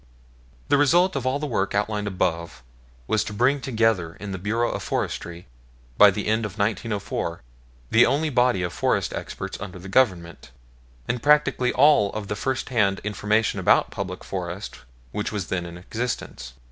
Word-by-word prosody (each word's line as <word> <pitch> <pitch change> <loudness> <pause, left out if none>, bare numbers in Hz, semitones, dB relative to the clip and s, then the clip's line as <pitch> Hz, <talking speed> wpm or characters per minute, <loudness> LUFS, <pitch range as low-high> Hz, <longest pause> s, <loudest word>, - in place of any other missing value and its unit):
The 145 - +4
result 175 +6 +4
of 130 -2 -2
all 130 +2 +1
the 150 - -4
work 100 -8 -1
outlined 105 0 -1
above 85 -8 -2 0.4
was 110 +8 +1
to 105 - -6
bring 130 +6 +2
together 110 -9 0
in 105 -1 -7
the 95 - -4
Bureau 115 +5 0
of - - -4
Forestry, 85 +1 -4 0.5
by - - +8
the - - -3
end 110 +1 +1
of 105 -1 -5
1904, 100 - -2 0.5
the 115 - +6
only 150 +2 0
body 125 -7 +2
of 85 - -3
forest - - 0
experts - - -6
under 95 -3 -7
the 90 +1 -10
Government, 90 - +1 0.6
and 120 0 -2
practically 145 -3 +3
all 135 -8 +4
of 105 -2 -5
the 105 - -1
first 130 +4 -2
hand 105 -6 +2
information 105 +1 0
about - - +3
the - - -13
public - - -5
forests 90 - -5 0.3
which 105 - -3
was 100 -5 -4
then 90 -2 -2
in 85 0 -9
existence. 90 - -5
105 Hz, 170 wpm, -24 LUFS, 95-125 Hz, 0.6 s, by